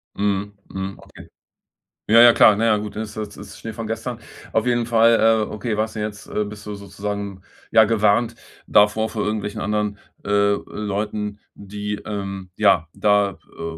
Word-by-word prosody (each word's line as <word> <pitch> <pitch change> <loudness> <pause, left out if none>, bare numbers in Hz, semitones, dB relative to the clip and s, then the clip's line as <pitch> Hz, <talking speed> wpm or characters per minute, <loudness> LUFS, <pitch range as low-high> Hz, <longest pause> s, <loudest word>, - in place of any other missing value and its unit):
Mhm, 100 0 -1 0.2
mhm. 95 0 -4
Okay. - - -15 0.8
Ja, 115 +2 +6
ja, 120 -1 +9
klar. 105 - +7
Na 115 - +1
ja, 110 -2 +4
gut, 105 -1 -6
ist 110 -1 -5
das 105 -1 -6
ist 100 -1 -11
Schnee 115 - -6
von 110 0 -5
gestern. 115 +2 -4 0.3
Auf 110 - +1
jeden 120 -1 +1
Fall, 115 0 +5 0.3
äh, - - -9
okay, 105 0 -3
warst 110 +1 -1
du 110 - -4
jetzt 105 -1 -5
äh, 105 - -1
bist 105 0 -9
du 105 - -5
sozusagen 100 0 -5 0.3
ja 110 - +7
gewarnt 110 +2 +2 0.3
davor, 105 +2 +4
vor 110 - -3
irgendwelchen 105 -1 -3
anderen, 105 -1 -1 0.3
äh, 100 0 +3
Leuten, 105 0 -4
die, 105 +1 -5
ähm, 100 -2 -5
ja, 80 - +4
da, 105 -2 +2 0.2
äh, 80 -1 -5
105 Hz, 175 wpm, -22 LUFS, 100-110 Hz, 0.8 s, ja